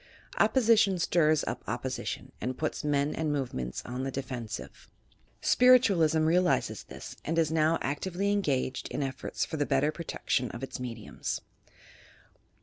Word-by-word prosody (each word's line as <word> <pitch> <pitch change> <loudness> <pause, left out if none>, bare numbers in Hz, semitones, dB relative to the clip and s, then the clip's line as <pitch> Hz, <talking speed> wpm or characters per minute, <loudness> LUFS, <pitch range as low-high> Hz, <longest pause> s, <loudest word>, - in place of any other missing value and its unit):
Opposition 225 -6 +4
stirs 155 -3 +3
up - - -4
opposition - - -4
and 125 +1 -3
puts 155 - -2
men 145 0 +1
and 160 -2 -1
move 140 -4 -2
ments 65 -1 -4
on 125 +2 -4
the 135 - -1
defensive. 125 -5 -6 0.5
Spiritualism 195 -12 +5
realizes 175 +2 +2
this - - -9
and 165 +2 -2
is 160 -2 +2
now 160 +1 +3
actively 185 +8 -1
engaged 140 -10 0
in 145 - -3
efforts 135 0 -3
for 160 - -5
the 145 - +1
better 150 - +2
protec 170 +1 -7
tion 125 -1 +2
of 120 - -8
its 135 - -5
mediums. 115 -4 -4
155 Hz, 145 wpm, -29 LUFS, 135-175 Hz, 0.5 s, Spiritualism